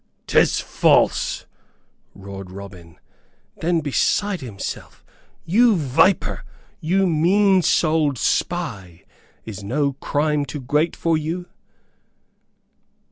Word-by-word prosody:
"'Tis - - +3
false!" - - +1 0.7
roared 95 -1 -9
Robin, 90 -3 -11 0.6
then 170 0 0
beside 185 +7 0
himself. 110 -7 -7 0.4
"You 220 +6 +4
viper 160 +4 +1 0.4
you 190 +5 +1
mean 185 +4 +3
souled 155 -5 +2
spy! 105 - -2 0.4
Is 105 -2 -8
no 140 +7 0
crime 145 +2 -1
too 145 0 -6
great 150 +6 0
for 165 -2 0
you?" 165 +4 -4
150 Hz, 90 wpm, -21 LUFS, 110-175 Hz, 0.7 s, You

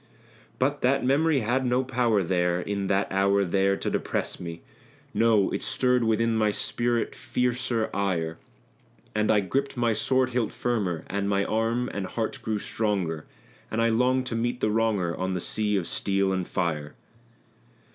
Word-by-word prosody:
But 140 +3 0
that 135 +1 +2
memory 145 +2 +3
had 120 +4 +1
no 125 +1 +2
power 120 -5 +1
there 90 0 +1
in 100 +1 -2
that 95 +1 +1
hour 100 +1 +3
there 95 +2 +2
to - - -5
depress - - -2
me 85 -1 -7 0.5
No! 110 -4 +3
it - - -2
stirred 125 -1 +1
within 115 +1 +2
my 110 -1 +3
spirit 120 +2 -1
fiercer 120 -2 -1
ire; 85 -5 -1 0.7
And 105 0 +1
I 105 - +4
gripped 135 +8 -2
my 120 -2 +2
sword 130 +4 +1
hilt 120 -3 -1
firmer, 100 -9 -1
and 100 +1 -2
my 100 0 +1
arm 115 +3 0
and 100 -2 -3
heart 110 +2 -3
grew 110 -1 -1
stronger; 95 -8 -2 0.4
And 110 - -2
I 115 0 +3
longed 125 +3 +2
to 120 - -3
meet 120 +2 -1
the 110 - +1
wronger 105 -6 +1
on 95 0 -2
the - - -1
sea 105 +3 0
of 90 - -1
steel 95 +1 0
and 95 -2 -2
fire. 75 -5 -2
110 Hz, 165 wpm, -26 LUFS, 95-120 Hz, 0.7 s, I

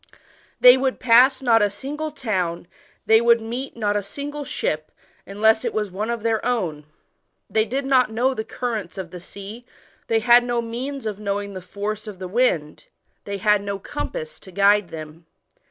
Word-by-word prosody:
They 250 +1 +9
would 260 0 -1
pass 255 +3 +5
not 230 -3 +4
a 205 - +3
single 290 +9 -5
town, 190 - -2 0.4
they 220 0 +6
w^uld 235 0 +4
meet 235 +4 -6
not 205 -2 0
a 205 - +1
single 290 +8 -6
ship, 155 - -3 0.4
unless 220 +3 +3
it - - -3
was 210 -3 -1
one 210 +5 -3
of 235 -2 -3
their 225 -1 0
own. 180 -12 -2 0.7
Thoy 220 0 +3
did 270 +3 -2
not 260 -3 +3
know 250 +4 +1
the 220 - -4
currents 220 -7 -4
of 185 -3 -6
the 180 - -8
sea, 200 +6 -10 0.4
they 225 - +2
had 240 +1 +6
no 240 -1 -1
means 245 +3 -5
of 210 -2 -4
knowing 200 -1 -3
the 185 - -7
force 205 +4 -5
of 205 -3 -7
the 185 0 -6
wind, 180 -8 0 0.4
they 200 0 -4
had 210 +1 +3
no 200 0 -3
compass 470 - -6
to 190 - -14
guide 200 0 +3
them. 160 +1 -9
220 Hz, 185 wpm, -22 LUFS, 200-245 Hz, 0.7 s, They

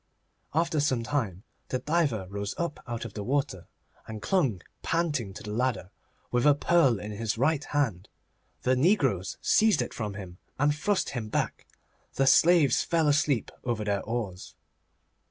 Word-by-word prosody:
After 165 -1 +1
some 130 -5 +1
time 115 -8 -2 0.2
the 130 - -1
diver 145 - 0
rose 100 +1 -4
up 170 -3 -3
out 120 -1 -4
of 110 - -8
the 105 - -5
water, 135 -7 -1 0.4
and 110 -1 -6
clung 135 - 0 0.2
panting 155 - -1
to - - -9
the 105 - -6
ladder 115 -5 -1 0.4
with 120 -1 +1
a 145 - +6
pearl 145 - +3
in 105 - -6
his 110 +1 -2
right 145 +4 +2
hand. 120 -12 -1 0.5
The 130 +1 +3
negroes 130 - +2
seized 215 -6 +4
it 120 - -2
from 105 -3 -4
him, 90 -3 -9 0.2
and 145 +2 +3
thrust 195 +7 0
him 115 -5 -4
back. - - -2 0.5
The 135 - +2
slaves 160 -2 +5
fell 165 -2 +1
asleep 145 -4 +2
over 120 -3 -1
their 100 -2 0
oars. 110 -6 -5
125 Hz, 160 wpm, -28 LUFS, 105-150 Hz, 0.5 s, a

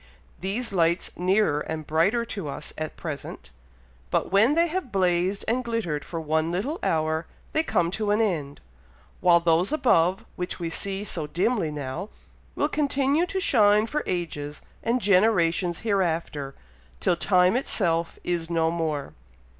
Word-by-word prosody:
These 205 +4 -2
lights 170 -1 +2
nearer 185 -4 +2
and 155 0 -5
brighter 195 +11 +2
to 200 -8 -5
us 140 - -6
at 155 0 -5
present; 155 -5 -7 0.6
but - - 0
when 220 +9 +4
they 335 +1 +4
have 340 -6 -3
blazed 185 0 +1
and 250 +3 +1
glittered 220 -11 -2
for 165 - -5
one 160 +1 0
little 215 - -2
hour, 160 0 0 0.3
they 315 - +3
come 175 - 0
to 210 +2 -2
an 210 +1 +3
end; 160 -10 -1 0.6
while 175 -1 +5
those 170 +2 +2
above, 190 - +2
which 180 0 -4
we 165 -1 -3
see 195 +3 -3
so 165 -6 -4
dimly 185 +3 0
now, 145 +6 -5 0.5
will 290 - +1
continue 290 +2 +1
to 380 - -2
shine 215 - +4
for 300 +6 -2
ages 150 -5 -4 0.2
and 240 +2 0
generations 180 -4 +2
hereafter, 165 -9 -1 0.4
till - - +2
time 180 +3 +3
itself 170 -9 0
is 170 -2 -2
no 165 -1 +1
more." 155 -4 -2
180 Hz, 150 wpm, -25 LUFS, 165-220 Hz, 0.6 s, while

